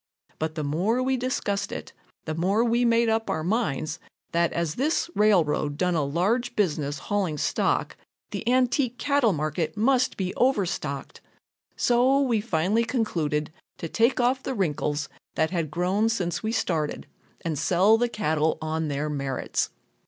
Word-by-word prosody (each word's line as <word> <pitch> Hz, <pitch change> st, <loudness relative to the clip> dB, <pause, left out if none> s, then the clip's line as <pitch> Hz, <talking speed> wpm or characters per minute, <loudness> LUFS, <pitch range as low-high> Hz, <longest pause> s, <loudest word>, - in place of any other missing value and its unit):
But 155 Hz, 0 st, -2 dB
the 155 Hz, -, -2 dB
more 190 Hz, -, +1 dB
we 265 Hz, +1 st, +1 dB
discussed 235 Hz, -6 st, -2 dB
it, -, -, -7 dB, 0.3 s
the 160 Hz, -, -2 dB
more 190 Hz, +7 st, +2 dB
we 240 Hz, +1 st, +2 dB
made 230 Hz, 0 st, +3 dB
up 225 Hz, 0 st, 0 dB
our 160 Hz, -, -1 dB
minds 165 Hz, -, -1 dB, 0.3 s
that 170 Hz, 0 st, +2 dB
as 170 Hz, -3 st, -1 dB
this 305 Hz, -, 0 dB
railroad 160 Hz, -8 st, +2 dB
done 180 Hz, +1 st, +1 dB
a 160 Hz, -3 st, +1 dB
large 215 Hz, -, 0 dB
business 150 Hz, -7 st, 0 dB
hauling 190 Hz, -7 st, -1 dB
stock, -, -, 0 dB, 0.4 s
the -, -, -3 dB
antique 250 Hz, 0 st, +2 dB
cattle 280 Hz, -6 st, +2 dB
market 155 Hz, +1 st, -2 dB
must 255 Hz, +3 st, +2 dB
be 185 Hz, -1 st, -2 dB
overstocked. 180 Hz, -, -1 dB, 0.5 s
So 250 Hz, +3 st, +3 dB
we 240 Hz, -6 st, +2 dB
finally 205 Hz, +2 st, +1 dB
concluded 165 Hz, -, -1 dB, 0.2 s
to 165 Hz, -, -5 dB
take 230 Hz, +10 st, +2 dB
off 255 Hz, +2 st, +2 dB
the 265 Hz, -, -3 dB
wrinkles 155 Hz, -5 st, -1 dB, 0.3 s
that 160 Hz, +1 st, +1 dB
had 165 Hz, -4 st, -1 dB
grown 185 Hz, +7 st, +1 dB
since 180 Hz, -6 st, -1 dB
we 220 Hz, -, -2 dB
started 160 Hz, -9 st, -1 dB, 0.4 s
and 160 Hz, -4 st, -2 dB
sell 185 Hz, +7 st, +4 dB
the 245 Hz, 0 st, +1 dB
cattle 160 Hz, -8 st, 0 dB
on 160 Hz, 0 st, -2 dB
their 145 Hz, +1 st, -2 dB
merits. 140 Hz, -3 st, -2 dB
185 Hz, 155 wpm, -26 LUFS, 155-235 Hz, 0.5 s, sell